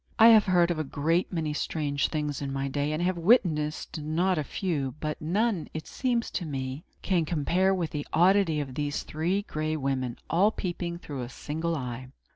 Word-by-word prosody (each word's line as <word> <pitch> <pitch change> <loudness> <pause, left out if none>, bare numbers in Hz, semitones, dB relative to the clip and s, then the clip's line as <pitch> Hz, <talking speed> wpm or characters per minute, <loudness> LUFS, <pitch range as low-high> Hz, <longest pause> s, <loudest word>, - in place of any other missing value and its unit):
I 225 +1 +9
have 220 -3 +7
heard 175 -2 +4
of 165 - -2
a - - 0
great 160 +5 0
many 160 -4 -1
strange 145 -2 -1
things, 150 -3 -3
in 140 -1 -3
my 135 0 -2
day, 145 +2 -1
and 155 +3 -1
have 180 -1 0
witnessed 165 -7 +2
not 165 +4 +1
a - - 0
few; 145 -6 -2
but 155 -1 -3
none, 195 +3 0
it 155 - -4
seems 245 -3 -1
to 180 - -3
me, 135 +1 -4
that - - -39
can 180 -4 +3
compare 175 +4 +1
with 180 -4 -1
the 145 -1 -4
oddity 175 -2 +4
of 135 -3 -4
these 145 +1 -2
Three 175 +6 -1
Gray 155 -3 -2
Women, 130 -4 -2
all 185 +6 +4
peeping 175 -4 -4
through 145 -6 -6
a 120 - -5
single 160 +5 -3
eye. 125 -2 -5
155 Hz, 200 wpm, -28 LUFS, 145-180 Hz, -, I